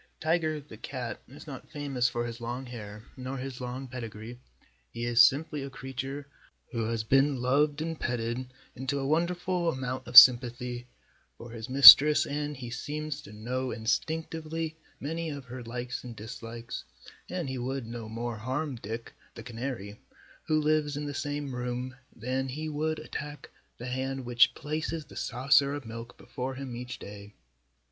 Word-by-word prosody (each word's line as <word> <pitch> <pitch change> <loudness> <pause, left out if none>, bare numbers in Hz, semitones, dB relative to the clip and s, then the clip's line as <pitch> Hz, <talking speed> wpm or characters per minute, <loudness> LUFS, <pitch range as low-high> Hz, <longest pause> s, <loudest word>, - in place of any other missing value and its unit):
Tiger, 155 -1 +1
the 140 -6 -12
cat, 125 0 -5
is 140 +4 -12
not 140 -4 -9
famous 140 -5 0
for 120 0 -2
his 115 0 -6
long 120 +3 -4
hair 105 -4 -8
nor 130 +1 -5
for 130 - -4
his 130 -2 -6
long 125 +2 -5
pedigree. 120 -1 -7 0.5
He 115 - -5
is 120 -1 +5
simply 145 +4 +4
a 135 - -5
creature 135 +1 -5 0.5
who 115 -3 -1
has 115 0 -1
been 135 +3 +3
loved 145 +4 +2
and 165 -1 -4
petted 120 +1 -2 0.3
into 130 +3 -2
a 135 - -2
wonderful 175 +3 +1
amount 130 -3 -3
of 125 +1 +3
sympathy 125 0 +8 0.5
for 120 - -10
his 115 0 -7
mistress 140 +3 +11
and 145 0 -3
he 120 -2 -7
seems 150 +4 -4
to - - -12
know 125 +5 -3
instinctively 160 +7 -2 0.2
many 165 +3 -3
of 140 -3 -6
her 125 +1 -8
likes 120 +2 -5
and 120 -2 -8
dislikes, 115 +2 -7 0.5
and 175 -4 -3
he 130 -1 -3
would 130 +1 -3
no 115 -1 -7
more 115 +1 -4
harm 130 +4 -3
Dick, 115 +1 -6 0.2
the - - -8
canary, 115 -3 -5 0.5
who 155 -2 +3
lives 150 -1 +1
in 150 - -3
the 145 - -4
same 145 -1 -3
room, 125 +1 -3 0.2
than 130 +3 -2
he 155 +4 -4
would 155 +1 -1
attack 150 -2 -7 0.3
the 120 - -7
hand 130 +1 -3
which 120 0 +4
places 155 +1 -3
the - - -15
saucer 140 +3 +3
of 145 -3 -7
milk 115 +1 -8
before 130 +1 -5
him 130 -2 -6
each 125 +1 -6
day. 100 0 -10
130 Hz, 170 wpm, -29 LUFS, 120-145 Hz, 0.5 s, mistress